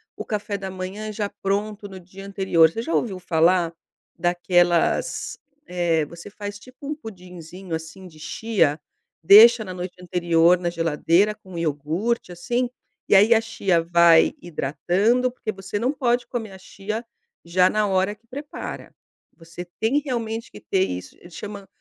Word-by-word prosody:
o - - -6
café 210 -2 -3
da 195 -1 -6
manhã 190 +4 -6
já 205 -1 -2
pronto 205 +1 -2
no 190 -1 -9
dia 190 +2 -13
anterior? 190 -5 +3
Você 225 - -4
já 330 - -3
ouviu 195 -6 -1
falar 170 0 +2 0.4
daquelas, 175 0 +1 0.3
eh, 170 -3 0
você 170 +6 -11
faz, 205 0 -7
tipo, 255 +4 -13
um 300 - -2
pudinzinho 180 - -10
assim 160 +4 -8
de 155 -3 -16
chia, 165 -5 0 0.4
deixa 220 +6 +8
na 185 - -6
noite 180 0 -6
anterior 175 -1 +3
na 175 - -1
geladeira 170 +4 +2
com 190 -4 -12
iogurte 165 +8 -2
assim, 240 +8 -2 0.4
e - - +6
aí 210 +4 +7
a 220 - +3
chia 200 -6 0
vai 170 -1 +5
hidratando, 190 - 0
porque 230 -3 -5
você 195 +1 -5
não 245 +4 +1
pode 250 -4 0
comer 225 -4 -5
a - - -10
chia 215 +4 -6 0.4
já 180 +2 +3
na 215 -1 +1
hora 190 +2 +1
que 220 - -37
prepara, 285 +4 -8 0.4
você 165 +1 -9 0.2
tem 240 +7 +2
realmente 230 -5 -4
que - - -11
ter 190 -1 0
isso 90 - -6
chama 200 +2 -8
190 Hz, 155 wpm, -23 LUFS, 170-215 Hz, 0.4 s, deixa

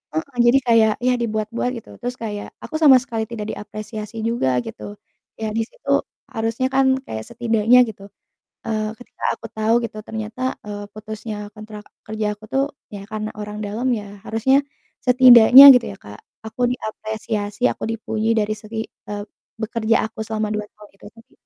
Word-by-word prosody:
Heeh, 245 - -4
jadi 245 +3 +6
kayak 225 -2 +5 0.2
ya 250 - +4
dibuat-buat 220 +2 -2
gitu, 225 - -12
terus 245 0 -4
kayak 205 -2 -5 0.2
aku 315 - -7
sama 285 -5 +8
sekali 225 -4 -3
tidak 220 -2 -6
diapresiasi 215 +1 -7
juga, 230 - 0 0.2
gitu, 225 -2 -8 0.5
ya 220 - -1
di - - +2
situ - - -6 0.4
harusnya 225 +3 -1
kan 270 0 +4 0.2
kayak 110 0 -5
setidaknya 230 0 +3
gitu, 205 -2 -9 0.6
eee, 215 -1 -1
ketika 245 - -17
aku - - -9
tau 220 +1 +1
gitu, 215 -1 -6
ternyata, 220 +2 -6 0.3
eee, 205 0 -6
putusnya 215 0 -7 0.2
kontrak 215 -1 -10 0.2
kerja 215 0 -3
aku 215 - -16
tuh, 270 +1 +2 0.3
ya 200 -1 -7
karena 215 0 -4
orang 210 0 -6
dalam 225 +5 -3
ya, 205 - -7 0.2
harusnya 230 +5 +2 0.5
setidaknya 250 0 +9
gitu 245 -1 +2
ya, - - -14
Kak, 105 +1 -11 0.3
aku 220 - -10
diapresiasi, 215 -2 -4
aku - - -6
dipuji 220 0 -2
dari 215 0 0
segi 220 +1 -5 0.3
eee, 205 0 -4 0.4
bekerja 225 +1 +1
aku 220 - -25
selama 215 -1 -2
2 210 0 -3
tahun 210 -1 -16
itu, - - -14
tapi 230 +3 -20
220 Hz, 165 wpm, -21 LUFS, 210-235 Hz, 0.6 s, setidaknya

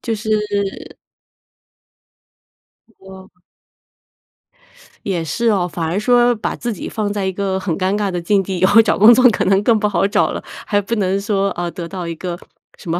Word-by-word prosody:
就 230 -2 -3
是 210 -2 -3 2.0
哦。 190 0 -13 1.8
也 180 -5 -2
是 230 +9 -1
哦。 185 -4 +1
反 165 0 -4
而 175 +5 -1
说 245 +1 +3
把 215 - -4
自 240 0 -4
己 - - -7
放 210 -2 -3
在 205 -2 -2
一 190 - -1
个 190 -1 -2
很 180 -4 -3
尴 190 +1 0
尬 205 -2 -1
的 180 -1 -3
境 195 +3 +2
地， 190 -1 -4
以 185 - +3
后 210 +4 +6
找 210 - 0
工 215 +4 +8
作 255 +2 +3
可 - - -1
能 195 +1 +3
更 225 0 +3
不 210 - +1
好 200 -1 +1
找 - - +1
了， - - -5 0.2
还 205 -2 +1
不 230 +4 -3
能 195 -1 0
说， 200 -1 0
呃， 175 0 -4
得 170 -2 -7
到 180 -2 -6
一 165 - -5
个 175 0 -5 0.4
什 170 - -10
么 170 +2 -1
195 Hz, 210 characters per minute, -18 LUFS, 185-210 Hz, 2.0 s, 工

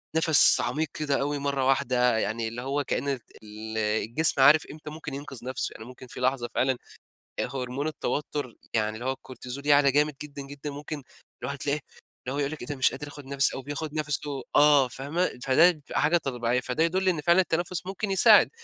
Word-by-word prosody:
نَفَس 160 -3 +7
عميق 155 +1 -1
كده 145 -3 -1
أوي 145 0 -1
مرة 140 -1 -1
واحدة. 125 -3 +2
يعني 110 +1 -2
اللي 115 +2 -6
هو 140 +3 -2
كأن 140 - -2
رت 135 -4 -3 0.2
ال 110 +1 -8
الجسم 110 +7 +1
عارف 150 +4 +6
إمتى 150 0 -10
ممكن 150 -2 -8
ينقذ 135 -3 -7
نفسه، 130 0 -2
يعني 110 - -11
ممكن 125 +1 -12
في - - -9
لحظة 125 -1 0
فعلًا، 130 0 +1 0.6
آآ - - +1
هرمون 130 +3 -3
التوتر 145 -4 -3 0.2
يعني 110 -1 0
اللي 120 +3 -7
هو 130 - +1
الكورتيزول 130 +1 -8
يعلى 145 -1 +5
جامد 150 +1 +2
جدًا 145 -1 -8
جدًا. 145 +1 -8
ممكن 145 0 -7 0.4
الواحد 140 +3 -4
تلاقيه 145 +2 -1 0.5
اللي 130 - -2
هو - - -2
يقول 140 0 -1
لِك 155 - -7
إيه 120 - -7
ده 145 - -4
مش 130 - +3
قادر 150 - -7
آخد 145 -1 -11
نَفَسي، 140 0 +1
أو 135 - -5
بياخد 145 +2 -5
نَفَسه 150 -2 -2
آه 145 -3 +6
فاهمة، 140 +5 -3
فده 155 +7 +6
بتبقي 150 -4 -4
حاجة 160 +3 +3
طبيعية. 125 -5 -1
فده 130 +5 -1
يدل 185 +3 +1
إن 165 -4 -1
فعلًا 170 +4 +4
التنفُس 175 0 -2
ممكن 195 +2 -4
يساعد. 195 - +6
140 Hz, 205 wpm, -26 LUFS, 125-150 Hz, 0.6 s, نَفَس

